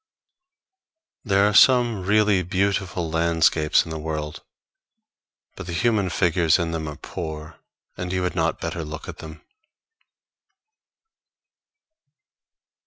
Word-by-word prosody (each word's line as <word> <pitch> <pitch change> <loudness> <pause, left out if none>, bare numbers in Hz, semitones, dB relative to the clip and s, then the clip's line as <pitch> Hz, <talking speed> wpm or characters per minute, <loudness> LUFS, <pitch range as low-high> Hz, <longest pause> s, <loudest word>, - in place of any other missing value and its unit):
There 100 -2 +3
are 105 - 0
some 120 -2 +5
really 105 0 +3
beautifully 95 0 -1
landscapes 80 -1 +2
in 80 - -8
the 80 - -5
world, 75 -1 -5 1.1
but - - -9
the 85 - -5
human 100 +2 +1
figures 85 -2 +2
in 85 -2 -2
them 80 -2 -4
are 75 - -6
poor, 80 0 -7 0.4
and 90 0 -4
you 90 -1 -1
had 90 - -1
not 85 -2 -1
better 85 0 -4
look 75 0 -8
at - - -9
them. 80 0 -11
85 Hz, 115 wpm, -23 LUFS, 80-95 Hz, 1.1 s, some